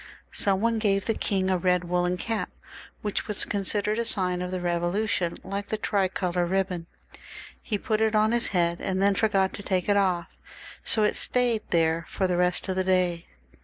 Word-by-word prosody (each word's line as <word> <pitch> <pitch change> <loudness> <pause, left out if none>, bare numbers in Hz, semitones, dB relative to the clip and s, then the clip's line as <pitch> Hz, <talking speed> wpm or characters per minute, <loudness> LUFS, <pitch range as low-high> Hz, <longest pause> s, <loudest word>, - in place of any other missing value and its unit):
Some 195 -2 +2
one 230 0 +1
gave 195 -2 +1
the 225 - +1
king 190 -3 -1
a 185 - +1
red 180 0 +2
woollen 180 +1 0
cap, 225 +4 -3 0.5
which 210 -1 -2
was 210 - +3
con 205 -2 -2
sidered 210 +3 0
a - - +1
sign 185 -5 0
of 180 - -3
the 185 - -3
Eevolution 175 +1 -1
like 200 +1 -4
the 215 - -2
tricolor 185 -3 0
ribbon. 180 -1 -1 0.7
He 210 - -2
put 215 +2 -1
it 220 0 +2
on 215 +1 +3
his 240 0 +1
head, 170 -2 0
and 190 -1 -1
then 200 +1 +4
forgot 195 -2 +1
to - - -7
take 185 -2 -1
it 205 -1 +3
off, 180 -4 +1 0.6
so 220 - +3
that 210 - +4
it - - -5
stayed 245 -3 +2
there 165 -1 +1
for 190 - -1
the 180 -1 +1
rest 180 0 +1
of 190 -1 -2
the 185 - +2
day. 180 -2 +1
190 Hz, 200 wpm, -26 LUFS, 180-210 Hz, 0.7 s, then